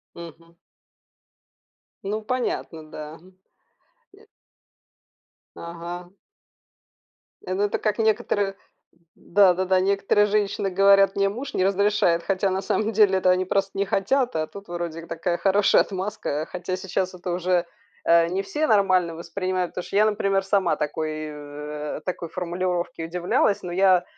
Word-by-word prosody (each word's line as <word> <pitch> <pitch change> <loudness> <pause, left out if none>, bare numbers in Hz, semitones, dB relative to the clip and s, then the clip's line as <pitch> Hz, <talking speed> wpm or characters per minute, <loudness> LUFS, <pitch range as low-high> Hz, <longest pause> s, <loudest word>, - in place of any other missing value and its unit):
Мгм. 170 0 -12 1.5
Ну, 210 +2 -3
понятно, 215 -9 -3
да, 150 0 -8
м. 185 +1 -20 0.8
Нет. 425 +2 -20 1.3
Ага. 170 +1 -7 1.4
Ну, 185 +2 -1
это 205 - 0
как 215 0 -1
некоторые, 210 -3 +1 0.6
да-да-да, 185 -1 +3
некоторые 200 +2 +2
женщины 205 -1 0
говорят: 195 +1 +5
"Мне 195 0 +2
муж 250 +7 -6
не 185 - +1
разрешает". 195 -3 +2
Хотя 195 0 0
на 190 +1 -1
самом 215 +3 0
деле, 200 -3 +4
это 185 - +2
они 185 0 +3
просто 195 +1 0
не 200 - +1
хотят, 245 +6 0
а 155 0 -1
тут 200 +2 -12
вроде 170 -1 -5
такая 170 +1 -2
хорошая 200 +1 +4
отмазка, 190 -6 -3
хотя 180 0 -4
сейчас 185 0 -2
это 180 0 -5
уже, 180 0 +1 0.4
э, 170 0 +5
не 185 +3 -1
все 300 +10 -2
нормально 185 -5 +3
воспринимают, 185 +1 -3
потому 180 - -6
что - - -6
я, 210 - +5
например, 195 -2 +1
сама 195 -2 +1
такой, 155 +1 -2 0.2
э, 150 0 -7
такой 175 -2 -4
формулировке 175 -1 -3
удивлялась, 180 +4 0
ну 175 - -5
я 185 -1 +4
185 Hz, 135 wpm, -24 LUFS, 175-200 Hz, 1.5 s, говорят